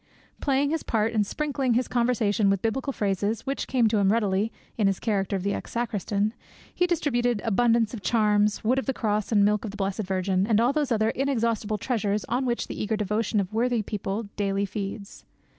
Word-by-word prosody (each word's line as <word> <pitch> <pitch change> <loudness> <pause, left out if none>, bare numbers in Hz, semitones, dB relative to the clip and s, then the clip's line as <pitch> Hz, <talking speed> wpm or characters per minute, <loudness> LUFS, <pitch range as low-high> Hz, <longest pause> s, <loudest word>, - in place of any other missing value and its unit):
Playing 280 +1 +1
his 325 -1 0
part 225 0 0
and 210 -3 +1
sprinkling 275 -4 -1
his 250 +1 +1
conversation 230 -4 +1
with 195 -1 0
biblical 265 +5 -1
phrases, 205 0 -1
which 275 +1 -2
came 250 -4 +3
to 215 -1 +1
him 195 -1 +3
readily, 210 -1 +1 0.2
in 210 -3 +2
his 195 -1 0
character 200 -3 0
of 190 0 -3
ex 200 - -3
sacristan, 215 -2 -1 0.4
he 360 - +2
distributed 245 -9 +1
abundance 230 +1 +2
of 225 - -6
charms, 210 -1 +2
wood 250 +4 +2
of 270 - -6
the 270 - +1
true - - -16
Cross 210 -1 0
and 205 -2 +5
milk 210 0 +2
of 220 - -4
the 205 - -9
Blessed 195 +1 -1
Virgin, 190 0 0
and 220 -2 +3
all 240 +4 +3
those 295 -3 0
other 220 -1 +2
inexhaustible 230 -5 0
treasures 210 -2 -1
on 250 +4 -1
which 240 -1 -1
the - - -5
eager 215 +1 -1
devotion 210 +1 0
of 195 +1 -3
worthy 235 0 +1
people 210 +1 -3
daily 200 -1 0
feeds. 200 +1 -6
220 Hz, 205 wpm, -26 LUFS, 200-240 Hz, 0.4 s, and